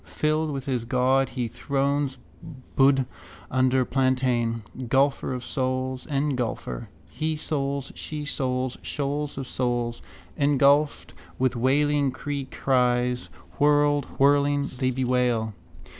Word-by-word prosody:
Filled 155 +1 0
with 135 -3 -4
his 125 -4 -1
god, 130 +2 +2
he 125 -2 -2
thrones, 140 +3 -1 0.6
Buddh 135 -1 +5 0.5
under 130 0 +3
plantain. 125 -3 +1 0.2
Gulfer 135 +2 +2
of 125 -1 -4
souls, 130 -1 -2
engulfer. 130 - -2 0.2
Hesouls, 145 -3 -2
shesouls, 130 -4 -3
shoals 145 0 -3
of 135 - -3
souls. 120 -2 -2 0.3
Engulfed 145 +1 +3 0.2
with 130 0 +1
wailing 140 +3 +2
creecries, 125 -3 0 0.3
whirled, 145 -1 +4
whirling, 145 +1 +3
they 130 -1 +2
bewail. 125 -3 +1
135 Hz, 100 wpm, -25 LUFS, 125-145 Hz, 0.6 s, Buddh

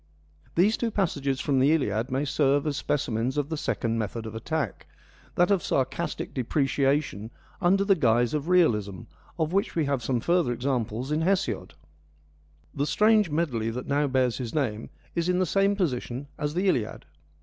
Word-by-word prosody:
These 200 +6 +3
two 235 - -1
passages 140 - -1
from 135 -1 +1
the 140 +4 +4
Iliad 115 -5 0
may 135 +2 -1
serve 145 0 +2
as 150 -2 -1
specimens 130 -2 -1
of 145 0 -1
the 160 - -2
second 115 -6 -1
method 110 +1 -4
of 110 - -6
attack, 150 +7 -3 0.5
that 175 +3 +3
of 195 -3 +3
sarcastic 140 +5 -2
depreciation 135 - 0 0.3
under 195 +2 +3
the 200 - +5
guise 120 -7 +2
of 150 +2 -2
realism, 105 - +2 0.4
of 160 +1 -1
which 200 +1 0
we 160 -3 +1
have 140 -2 0
some 125 0 0
further 170 -2 +1
examples 125 0 -2
in 155 +1 +1
Hesiod. 190 +3 -1 1.0
The 145 - -1
strange 215 -1 +4
medley 140 -8 -1
that 125 +2 -5
now 145 +1 +1
bears 130 -2 +1
his 120 0 -5
name 115 -7 -1 0.2
is 170 +1 -1
in 180 - +2
the 185 - +2
same 195 +3 +2
position 130 -7 -2
as 150 0 -3
the 185 +3 +1
Iliad. 120 - -1
140 Hz, 170 wpm, -26 LUFS, 120-170 Hz, 1.0 s, the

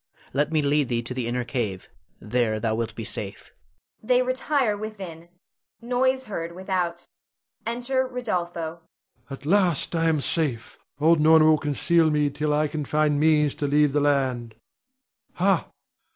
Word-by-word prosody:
Let 145 +3 +1
me 155 -2 +2
lead 145 -1 +1
thee 120 -1 -1
to 120 - -5
the 125 -2 -3
inner 125 +1 -1
cave, 115 -7 -3 0.3
there 110 -1 0
thou 110 0 0
wilt 115 0 -3
be 115 - -5
safe. 100 -2 -5 0.5
[They 250 +3 +3
retire 255 -2 0
within; 190 -6 -8 0.5
noise 260 +2 0
heard 170 -6 -5
without. 180 -2 -2 0.6
Enter 250 +3 0
Rodolpho. 175 -9 -3
Rod. - - -35 0.5
At 135 0 -9
last 180 -3 +2
I 165 -1 +1
am 155 -2 +1
safe. 140 -6 -2 0.2
Old 160 +2 +4
Norna 160 0 +6
will 155 -1 +5
conceal 160 +3 +2
me 150 -1 +1
till 150 +1 -1
I 150 +1 +2
can 150 0 -4
find 150 0 +1
means 150 -2 +3
to 145 - +1
leave 145 0 +3
the 145 - +3
land. 130 -5 0 0.8
Ha! 185 -1 +1
155 Hz, 155 wpm, -25 LUFS, 140-185 Hz, 0.8 s, Norna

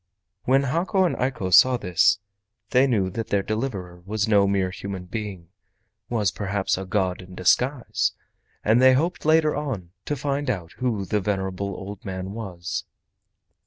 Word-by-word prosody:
When 135 +2 +4
Hako 170 +8 +1
and 175 - 0
Eiko 125 -8 -1
saw 130 +7 +7
this, 90 +2 +3 0.5
they 130 +2 +5
knew 100 -7 +1
that 115 +4 -4
their 100 -1 +1
deliverer 100 -6 -4
was 105 +3 -1
no 100 -2 +4
mere 95 -2 +1
human 95 -1 -6
being—was 100 +1 -5
perhaps 95 +4 -1
a 95 - -5
god 95 -2 0
in 90 0 -12
disguise—and 120 +1 0
they 130 0 +7
hoped 165 +7 0
later 155 -1 +4
on 125 -13 -4
to 145 - -1
find 145 -1 -2
out 90 -8 -3
who 115 -6 -1
the 105 +3 0
venerable 95 0 -2
old 100 +1 -8
man 95 0 -5
was. 95 -5 -5
100 Hz, 150 wpm, -24 LUFS, 95-125 Hz, 0.5 s, saw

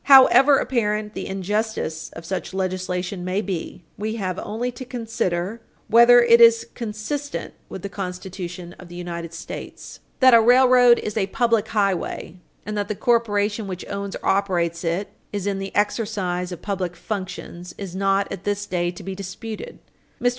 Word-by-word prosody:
However 275 +1 +8
apparent 215 -5 -1
the - - -5
injustice 195 -3 -2
of 165 - -9
such 190 +1 -4
legislation 185 -1 -2
may 185 +2 -1
be, 185 -3 -4 0.2
we 220 +2 -2
have 185 -4 -3
only 235 +4 -3
to 245 +2 -8
consider 225 -5 -3 0.3
whether 235 +1 +8
it 235 0 +6
is 230 -1 +7
consistent 245 +6 -4 0.2
with 190 - -8
the - - -2
Constitution 180 -2 -6
of 180 - -11
the 175 - -11
United 170 -1 -5
States. 165 - -8 0.2
That 260 -1 +7
a 230 - +8
railroad 245 0 +6
is 210 - -4
a 195 -3 +1
public 230 -1 +1
highway, 195 -4 -1 0.3
and 210 - -4
that 205 -1 -1
the 210 - -3
corporation 210 -2 +1
which 185 -2 -6
owns 200 0 -4
or - - -8
operates 175 -4 +1
it 170 +4 -1 0.2
is 205 -2 -3
in 200 -1 -1
the 195 0 -5
exercise 200 -4 -1
of 175 -1 -8
public 185 -4 -2
functions, 180 -2 -6
is 190 -3 -7
not, 195 +1 +1
at 195 -1 -6
this 205 0 -1
day, 175 -3 -1
to 180 +2 -8
be 190 +1 -5
disputed. 205 - -7 0.4
Mr. 245 - +3
200 Hz, 170 wpm, -23 LUFS, 180-225 Hz, 0.4 s, However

